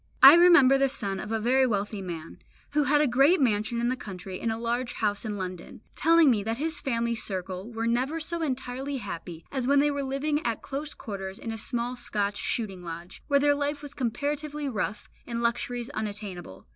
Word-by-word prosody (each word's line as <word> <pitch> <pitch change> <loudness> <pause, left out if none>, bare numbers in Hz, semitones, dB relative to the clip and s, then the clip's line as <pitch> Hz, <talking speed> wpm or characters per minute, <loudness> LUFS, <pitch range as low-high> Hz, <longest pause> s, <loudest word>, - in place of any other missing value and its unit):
I - - +13
remember 335 -6 +7
the 275 0 +3
son 200 -7 -2
of 210 - -6
a 225 - 0
very 260 +4 +3
wealthy 205 -2 -2
man, 165 -3 -7 0.3
who 295 0 +2
had 295 +2 +4
a 300 - +3
great 275 +9 +4
mansion 220 -2 +1
in 240 +1 +1
the 255 - 0
country 190 -5 -7
and 230 - -1
a 220 - -2
large 240 +2 -2
house 205 0 -1
in 210 -1 -3
London, 185 0 -7
telling 330 -2 +5
me 215 -4 +1
that 225 +3 -2
his 315 +2 -1
family 235 -3 -1
circle 190 -1 -5
were 225 0 -3
never 255 +7 0
so 335 +2 -3
entirely 270 -1 -3
happy 170 -6 -7
as 260 -3 -2
when 280 +1 +5
they 295 +1 +3
were 285 0 -2
living 280 +3 -1
at 230 -2 -2
close 285 +2 -4
quarters 195 -2 -6
in 225 - -5
a - - -4
small 240 +2 -2
Scotch 205 -4 -1
shooting 195 -6 -2
lodge, 170 +1 -8
where 280 -1 +4
their 290 +1 +4
life 285 +1 -2
was 285 -1 -8
comparatively 290 +4 -2
rough, 210 -4 -3 0.2
and 235 -1 -3
luxuries 240 0 -1
unattainable. 200 - -6
240 Hz, 205 wpm, -27 LUFS, 205-280 Hz, 0.3 s, I